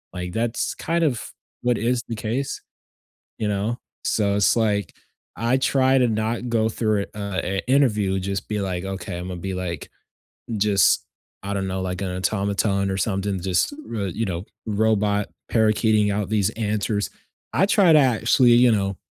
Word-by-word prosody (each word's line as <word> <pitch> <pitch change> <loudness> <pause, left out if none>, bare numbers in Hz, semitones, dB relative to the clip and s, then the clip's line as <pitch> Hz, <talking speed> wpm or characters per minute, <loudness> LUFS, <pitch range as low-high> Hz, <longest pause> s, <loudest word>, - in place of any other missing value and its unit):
lke, 90 0 -4
that's 115 +1 -1
kind 170 0 -1
of, 130 -7 -1 0.3
what 120 -2 +1
is 120 +2 0
the 115 - -4
case, 120 +6 -3 0.8
you 105 - 0
know? 105 +4 -1 0.3
So 100 -2 +1
it's 105 - +4
like, 105 -3 0 0.4
I 120 +3 +1
try 130 0 +3
to 125 -1 +4
not 110 +2 -1
go 110 -1 +2
through 110 -3 0
a - - -11
an 95 -1 -2
interview, 105 -8 +2
just 100 +1 -3
be 105 -1 -2
like, 95 -2 -3
okay, 95 -2 -5
Imma 90 0 -5
be 95 +2 -4
like, 90 -4 -4 0.7
just, 100 -3 +3 0.4
I 100 +1 -4
don't 95 -1 -1
know, 95 0 -2
like 90 0 -3
an 90 -1 -3
automaton 100 +1 0
or 95 - -1
something, 95 0 -1
just 95 - +1 0.2
r - - -3
r - - -1
you 115 +6 -2
know, 90 -1 -3 0.2
robot 105 -1 +1 0.2
parakeeting 110 -1 +3
out 100 -1 -2
these 105 -3 +2
answers. 105 -1 -1 0.4
I 195 - +3
try 195 -5 +5
to 155 - +8
actually, 120 0 +4
you 120 0 +6
know, 100 -2 0
105 Hz, 170 wpm, -23 LUFS, 95-115 Hz, 0.8 s, to